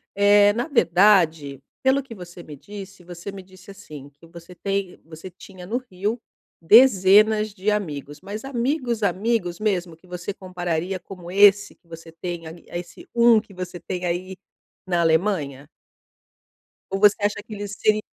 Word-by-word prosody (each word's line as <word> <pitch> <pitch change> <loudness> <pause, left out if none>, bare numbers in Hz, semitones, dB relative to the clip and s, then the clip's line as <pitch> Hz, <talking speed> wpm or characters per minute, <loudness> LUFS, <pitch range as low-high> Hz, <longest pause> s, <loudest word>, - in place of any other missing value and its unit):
Eh, 205 0 +5
na 240 +6 -2
verdade, 170 - +3 0.2
pelo 265 +1 +3
que 240 -4 -12
você 175 -1 -11
me 150 -3 -11
disse, 200 +3 -11
você 175 +2 -8
me 195 -1 -10
disse, 185 +1 -18
assim, 150 -7 -11
que 165 - -19
você 170 +1 -14
tem 195 +1 -3
você 160 +3 -10
tinha 180 0 -13
no 235 +4 -1
Rio, 215 -1 -4 0.4
dezenas 215 +1 +5
de 205 +1 -2
amigos, 150 -8 -3
mas 205 +4 -7
amigos, 250 -3 -2
amigos 200 -3 -1
mesmo? 180 -6 -1
Que 180 +3 -24
você 180 +2 -6
compararia 180 -1 -4
como 180 -1 -11
esse 205 +1 +4
que 170 - -35
você 165 0 -11
tem 170 0 -6
ai 165 +2 -12
a 175 - -3
esse 175 - -12
1 235 -1 +5
que 205 -2 -14
você 180 -1 -7
tem 180 -1 -5
aí 185 +2 -3 0.5
na 175 -2 +1
Alemanha? 160 -5 0 1.2
Ou 195 - -2
você 210 0 +6
acha 205 0 0
que 220 0 -11
ele 205 0 -5
seria 215 +1 +1
190 Hz, 165 wpm, -23 LUFS, 170-210 Hz, 1.2 s, você